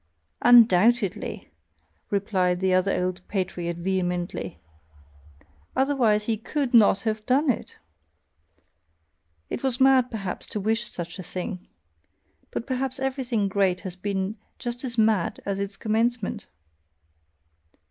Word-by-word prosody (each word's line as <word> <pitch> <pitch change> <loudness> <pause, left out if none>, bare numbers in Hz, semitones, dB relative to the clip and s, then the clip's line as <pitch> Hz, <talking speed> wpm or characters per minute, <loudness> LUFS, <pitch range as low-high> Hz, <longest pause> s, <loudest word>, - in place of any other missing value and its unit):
"Undoubtedly!" 230 -3 +4 0.6
replied 190 -3 +1
the 190 0 +2
other 185 0 +2
old 185 0 -3
patriot 180 -3 -3
vehemently, 175 - -2 1.2
"otherwise 255 -6 +2
he 220 0 -1
COULD 260 +3 -2
NOT 215 -4 +6
have 215 -1 -2
done 270 +2 +3
it! - - -7 1.7
It - - -3
was 265 -1 -1
mad 260 -2 +5
perhaps 205 -5 -4
to 210 - -4
wish 220 +3 0
such 175 +2 -6
a - - -5
thing! 180 +1 -6 0.8
But - - -4
perhaps 260 0 -2
everything 260 -6 -1
great 190 -2 +1
has 185 -3 -6
been 195 +2 -3 0.2
just 240 +1 -4
as 240 -2 -2
mad 215 -5 +2
at 195 -1 -2
its 200 0 -4
commencement!" 225 0 -1
210 Hz, 115 wpm, -25 LUFS, 185-240 Hz, 1.7 s, NOT